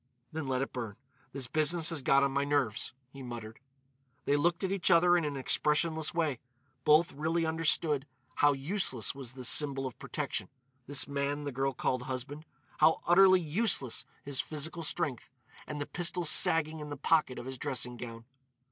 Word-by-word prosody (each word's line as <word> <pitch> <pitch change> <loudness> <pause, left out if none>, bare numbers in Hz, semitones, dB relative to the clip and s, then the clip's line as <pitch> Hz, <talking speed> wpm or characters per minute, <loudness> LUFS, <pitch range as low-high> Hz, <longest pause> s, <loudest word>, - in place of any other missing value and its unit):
"Then 155 -3 -4
let 130 0 0
it - - -7
burn. 115 -5 -5 0.4
This 135 -1 -4
business 155 +5 +1
has 160 -4 -1
got 135 +1 +4
on 140 - +1
my 140 +1 0
nerves," 140 -7 -1 0.2
he 135 - -11
muttered. 115 -3 -8 0.7
They 145 - +2
looked 170 +5 +1
at 190 - -1
each 195 -1 +2
other 175 0 +5
in 175 - +2
an 145 -2 -3
expressionless 150 +3 +1
way. 160 -7 -1 0.4
Both 160 +4 +4
really 160 +3 -1
understood 160 -3 0 0.3
how 145 0 +5
useless 135 - -2
was 135 -3 -7
this 130 -2 -1
symbol 135 -1 +3
of 130 - -7
protection—this 130 +1 -3
man 140 +1 -2
the 145 - -4
girl 135 +1 -1
called 130 0 -1
husband;—how 145 +4 -1
utterly 185 +1 +6
useless 155 - +1 0.2
his 140 -1 -1
physical 160 +3 -4
strength, 155 -5 -3 0.4
and 150 -1 -5
the 145 - -2
pistol 175 +2 -1
sagging 160 0 +4
in 150 -1 -7
the 145 - -6
pocket 155 -3 +2
of - - -7
his 130 -1 -6
dressing 125 -4 -2
gown. 115 -1 -8
145 Hz, 170 wpm, -31 LUFS, 130-160 Hz, 0.7 s, utterly